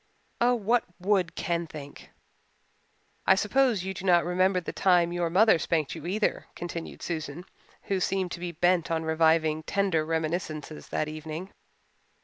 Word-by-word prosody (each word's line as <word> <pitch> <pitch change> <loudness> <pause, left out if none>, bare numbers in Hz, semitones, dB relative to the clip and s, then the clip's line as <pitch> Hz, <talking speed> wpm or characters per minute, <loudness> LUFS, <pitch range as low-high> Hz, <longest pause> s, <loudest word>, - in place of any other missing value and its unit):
Oh, 245 +1 +4
what 230 +2 +2 0.2
would 185 -2 +1
Ken 170 -1 -1
think? 145 -2 -10 1.2
"I 190 - +7
suppose 225 0 +2
you 190 0 -3
do 185 - -8
not 175 -3 +4
remember 185 +1 +2
the 175 - -6
time 175 -2 +3
your 175 -1 0
mother 190 0 +5
spanked 160 -4 0
you 160 0 -7
either," 210 +4 -1
continued 170 -1 -6
Susan, 160 0 -4 0.4
who 195 -1 -1
seemed 185 -1 -1
to - - -5
be 175 0 -4
bent 175 +1 +2
on 165 -1 0
reviving 160 -1 +2
tender 190 -2 0
reminiscences 160 -1 -3
that 155 - -1
evening. 155 +4 -6
175 Hz, 150 wpm, -27 LUFS, 160-190 Hz, 1.2 s, I